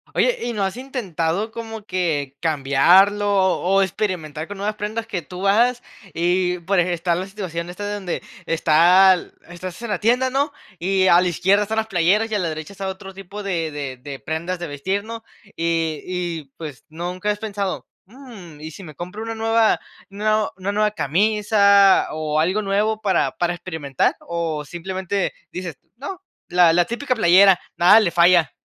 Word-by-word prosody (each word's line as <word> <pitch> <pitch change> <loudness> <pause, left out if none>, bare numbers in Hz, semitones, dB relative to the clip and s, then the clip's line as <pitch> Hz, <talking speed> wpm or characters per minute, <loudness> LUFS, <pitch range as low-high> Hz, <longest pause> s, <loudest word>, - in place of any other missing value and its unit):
Oye, - - +2
¿y 240 - -3
no 205 -3 -1
has 190 +1 -2
intentado 210 - -3
como 225 -2 -7
que 160 -8 -2
cambiarlo 170 +7 +4 0.3
o 195 +2 +2
experimentar 175 -6 -3
con 205 -1 -8
nuevas 210 +2 -2
prendas 215 +2 -4
que 190 -6 -4
tú 180 +6 -5
hagas? 240 +4 +3 0.3
Y, 180 +1 +1
por 185 +2 0
eje 175 0 +1
está 170 +1 0
la 180 +3 -3
situación 175 -4 -5
esta 205 +3 -6
de 205 - -3
donde 190 -4 -4 0.2
está 170 +4 +5
l 180 - -5 0.2
estás 175 0 -8
en 235 - -5
la 200 -4 -1
tienda, 250 +4 +2
¿no?, 285 +2 0 0.3
y 190 +2 +1
a 175 0 +6
la 185 - +1
izquierda 190 +4 +2
están 220 +2 -3
las 220 0 0
playeras, 200 +4 +2
y - - 0
a - - +1
la 175 -3 -1
derecha 155 +5 -7
está 195 0 -5
otro 190 0 -7
tipo 195 +2 -9
de 170 -5 -2
de 140 -3 -5
de 140 +1 -8
prendas 165 +5 -3
de 175 -1 -5
vestir, 190 +8 -3
¿no?, 230 +1 -8 0.3
y 165 -2 -1
y, 175 -4 -4
pues, 150 -5 -9
nunca 180 +5 -4
has 210 - 0
pensado: 200 -3 -4 0.2
"¿Mm, 215 - -13
y 160 +1 -7
si 195 - -11
me 155 -4 -11
compro 180 +6 -7
una 225 0 -4
nueva, 225 0 +2 0.3
nue 215 +2 0
una 195 +2 -3
nueva 210 +1 +2
camisa 200 - +4
o 155 -1 -1
algo 185 +7 +1
nuevo 210 +2 0
para 200 -3 0
para 175 0 0
experimentar?" 160 -7 -2
¿O 165 -3 -3
simplemente 190 +4 -3 0.2
dices: 175 -6 -6 0.2
"No, 370 +8 -7 0.2
la 175 -2 +4
la 175 0 +3
típica 255 +3 -2
playera, 190 -3 +5 0.2
nada 195 +6 +7
le 200 -6 +2
falla?". 170 -4 +4
185 Hz, 180 wpm, -21 LUFS, 170-210 Hz, 0.3 s, nada